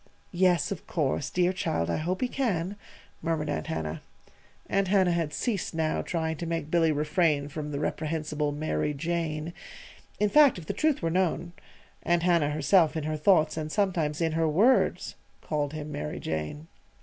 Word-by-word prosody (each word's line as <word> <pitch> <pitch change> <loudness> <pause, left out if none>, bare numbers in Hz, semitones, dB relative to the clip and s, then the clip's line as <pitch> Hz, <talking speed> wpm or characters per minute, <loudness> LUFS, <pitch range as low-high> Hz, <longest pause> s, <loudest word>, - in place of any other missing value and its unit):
"Yes, 180 0 +2
of 190 - -6
course. 145 -3 -1
Dear 180 0 +1
child! 85 - -1
I - - 0
hope 175 +4 -2
he 255 - +2
can," 205 -8 -1 0.5
murmured 160 -2 -1
Aunt 80 - -3
Hannah. 80 0 -3 0.7
(Aunt 195 -1 +1
Hannah 190 -2 +3
had 165 -3 0
ceased 205 -6 -2
now 160 -1 0
trying 160 -2 -2
to 170 - -5
make 165 -2 -3
Billy 165 -2 +3
refrain 150 -1 +1
from 150 0 -5
the 140 -1 -3
reprehensible 155 -1 -2
"Mary 145 - -1
Jane." 165 +1 -2 0.7
In 210 - +3
fact, 295 -1 +6
if 170 - -8
the - - -3
truth 310 - +1
were 165 - +1
known, 175 -1 0 0.5
Aunt 175 -1 +1
Hannah 170 -5 +3
herself 155 +3 +3
in 155 - -2
her 155 +1 -2
thoughts 155 -1 +3
and 155 -1 -3
sometimes 170 -7 0
in 165 -1 +1
her 160 0 +1
words 210 +12 +3 0.3
called 145 -1 -2
him 150 -1 -6
"Mary 75 - -4
Jane.") 80 - -4
160 Hz, 175 wpm, -28 LUFS, 150-180 Hz, 0.7 s, fact